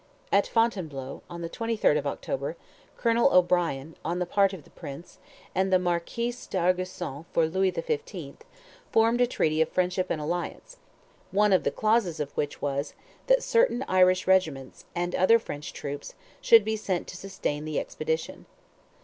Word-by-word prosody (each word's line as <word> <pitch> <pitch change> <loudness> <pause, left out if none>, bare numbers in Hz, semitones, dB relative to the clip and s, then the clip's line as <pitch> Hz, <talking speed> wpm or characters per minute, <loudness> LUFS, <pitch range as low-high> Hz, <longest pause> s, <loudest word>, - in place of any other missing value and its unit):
At 200 +1 +4
Fontainebleau, 165 - -1
on 170 -1 -7
the 165 - -4
23rd 225 -6 +1
of 145 -1 0
October, 140 +3 -3 0.4
Colonel 235 +3 +3
O'Brien, 170 -5 +2
on 170 +3 -2
the 180 - 0
part 195 +2 +3
of 185 -6 -9
the - - -21
prince, 145 +6 -10 0.3
and 190 0 +1
the 185 - +6
Marquis 180 +7 -1 0.2
D'Argeusson 180 -4 -1
for 165 - +3
Louis 190 +3 +1
XV., 465 - -4 0.5
formed 230 +2 +3
a 245 - +5
treaty 155 -9 +1
of 160 - +2
"friendship 185 0 0
and 155 - -1
alliance," 175 - -4 0.5
one 205 +1 +3
of 185 - +4
the - - +2
clauses 215 -7 +1
of 145 -1 -3
which 145 - -3
was, 140 0 -2 0.3
that - - +4
certain 460 - +2
Irish 185 0 +4
regiments, 160 -9 +1
and 175 +1 -1
other 190 +5 +5
French 150 -9 -7
troops, 145 0 -6 0.3
should 225 -3 +7
be 220 0 0
sent 190 -5 -2
to - - -8
sustain 175 -6 -4
the 155 -1 -1
expedition. 475 0 -4
185 Hz, 160 wpm, -27 LUFS, 160-220 Hz, 0.5 s, should